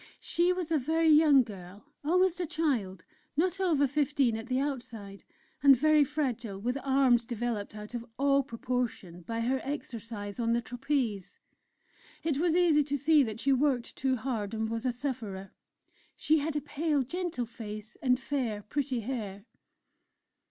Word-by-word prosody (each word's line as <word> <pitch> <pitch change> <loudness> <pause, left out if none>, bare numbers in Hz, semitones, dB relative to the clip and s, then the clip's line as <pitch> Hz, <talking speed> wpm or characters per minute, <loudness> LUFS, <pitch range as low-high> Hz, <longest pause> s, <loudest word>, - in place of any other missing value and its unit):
She 350 +1 +2
was 360 -3 -3
a 315 - +3
very 320 +4 +2
young 300 -3 +6
girl, 200 -1 -11 0.2
almost 360 +3 +2
a 350 - -1
child, 245 - -1 0.3
not 365 +4 +1
over 325 -7 +3
fifteen 280 -3 +1
at 225 +1 -6
the 255 +1 0
outside, 235 -8 -5 0.4
and 275 -1 +7
very 305 +2 +5
fragile, 250 -8 -2
with 245 +5 -1
arms 265 -3 +4
developed 230 -3 -3
out 210 +2 -9
of 240 -1 -4
all 275 +1 +3
proportion 240 -8 -4
by 230 +6 -4
her 260 +3 0
exercise 230 -7 -6
on 230 -1 +1
the 235 - +1
trapeze. 245 -5 -2 0.9
It 305 -4 0
was 340 0 +2
easy 335 -4 +4
to 285 0 -2
see 300 +2 +4
that 220 -4 -2
she 275 +2 +2
worked 260 -3 +1
too 265 -1 +1
hard 225 -4 -3
and 220 0 -1
was 230 +2 -2
a - - +2
sufferer; 230 -7 -5 0.6
she 315 +1 +2
had 300 +1 -2
a 295 - 0
pale, 295 -1 0
gentle 330 -2 -3
face 215 -2 -8
and 250 -2 +2
fair, 245 -7 -2
pretty 265 +1 -2
hair. 210 -4 -5
255 Hz, 160 wpm, -30 LUFS, 225-295 Hz, 0.9 s, and